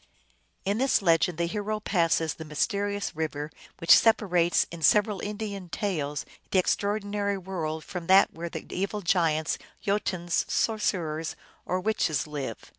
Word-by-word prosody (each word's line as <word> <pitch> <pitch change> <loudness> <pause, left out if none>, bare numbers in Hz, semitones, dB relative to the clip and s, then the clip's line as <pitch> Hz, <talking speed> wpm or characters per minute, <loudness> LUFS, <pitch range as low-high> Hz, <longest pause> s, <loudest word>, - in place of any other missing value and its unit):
In 200 +3 0
this 265 -5 +2
legend 165 -1 +3
the 170 - +1
hero 210 +4 -2
passes 165 -6 +1
the 160 - -9
mysterious 200 +6 -1
river 150 -1 -3 0.3
which 165 - +7
separates 180 -6 +3
in 170 -1 -8
several 210 +3 +4
Indian 205 -3 -5
tales 155 -8 -2 0.2
the 185 -1 +3 0.2
ordinary 205 -1 -1
world 165 -4 -4
from 180 -3 -6
that 190 +1 +6
where 170 +1 -5
the - - -7
evil 200 +3 -2
giants, 165 -4 +1 0.2
Jotuns, 185 -4 0
sor 225 -1 +1
cerers, 160 -6 -1 0.3
or 185 - 0
witches 180 -8 0
live. 140 -7 -4
180 Hz, 140 wpm, -27 LUFS, 160-205 Hz, 0.3 s, which